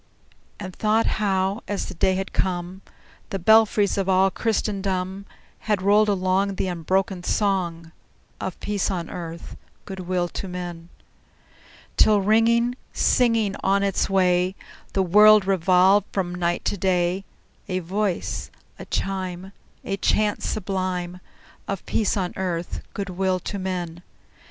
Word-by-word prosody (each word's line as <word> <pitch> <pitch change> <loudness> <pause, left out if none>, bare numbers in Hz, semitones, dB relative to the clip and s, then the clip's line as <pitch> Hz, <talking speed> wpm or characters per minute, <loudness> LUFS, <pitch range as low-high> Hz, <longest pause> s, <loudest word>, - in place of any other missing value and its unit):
And 185 -3 -7
thought 220 +1 +2 0.2
how, 195 +1 0
as 205 - -2
the - - -7
day 185 +2 +1
had 190 +1 -4
come, 180 0 -2 0.5
The 195 - -2
belfries 210 0 +4
of 195 -1 -1
all 190 +1 +4
Christendom 195 -3 -2 0.4
Had 205 -3 +1
rolled 210 +2 +4
along 195 0 +1
The - - -1
unbroken 185 +2 -1
song 175 -4 -1 0.5
Of 185 - -5
peace 205 -2 -1
on 175 -4 -3
earth, 170 -1 -7 0.3
good 190 -1 -7
will 180 -1 -1
to 195 - -5
men! 175 -2 -7 1.1
Till, 210 -1 +5
ringing, 230 +4 +3 0.2
singing 230 -5 +2
on 200 +1 +2
its 195 -1 0
way, 185 -1 +2 0.4
The 190 - +2
world 210 +2 +6
revolved 190 +2 +4
from 180 -3 -2
night 175 -1 -1
to 205 - 0
day, 180 0 +1 0.4
A 185 -2 -1
voice, 185 +1 -2 0.3
a - - -7
chime, 190 -1 -3 0.3
A 195 - -2
chant 210 +1 +1
sublime 185 -3 -3 0.5
Of 195 -2 -4
peace 215 -1 0
on 180 -2 -2
earth, 175 -2 -3
good 200 -2 -4
will 185 0 0
to 200 - -5
men! 175 -3 -4
190 Hz, 135 wpm, -23 LUFS, 180-200 Hz, 1.1 s, world